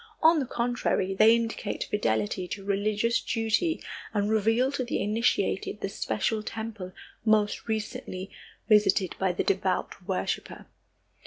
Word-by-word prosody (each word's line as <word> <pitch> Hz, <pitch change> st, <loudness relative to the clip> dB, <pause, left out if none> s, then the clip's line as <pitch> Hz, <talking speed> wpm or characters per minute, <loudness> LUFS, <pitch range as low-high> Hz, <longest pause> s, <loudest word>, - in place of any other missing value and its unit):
On 320 Hz, 0 st, +6 dB
the 265 Hz, -, -2 dB
contrary, 235 Hz, -6 st, 0 dB
they 215 Hz, +4 st, +6 dB
indicate 225 Hz, -2 st, -2 dB
fidelity 110 Hz, -, -1 dB
to 195 Hz, +2 st, -6 dB
religious 205 Hz, +3 st, +1 dB
duty 230 Hz, +9 st, 0 dB, 0.3 s
and 205 Hz, +1 st, +1 dB
reveal 225 Hz, +5 st, +2 dB
to 280 Hz, -2 st, -2 dB
the 245 Hz, -, -2 dB
initiated 215 Hz, +4 st, 0 dB
the -, -, -2 dB
special 220 Hz, -1 st, -1 dB
temple 220 Hz, -4 st, -6 dB, 0.3 s
most 215 Hz, -1 st, +2 dB
recently 210 Hz, -3 st, -4 dB, 0.4 s
visited 210 Hz, -4 st, +4 dB
by 190 Hz, -1 st, +2 dB
the 175 Hz, -, -1 dB
devout 185 Hz, -1 st, -1 dB
worshiper. 190 Hz, -2 st, -3 dB
215 Hz, 130 wpm, -28 LUFS, 195-230 Hz, 0.4 s, On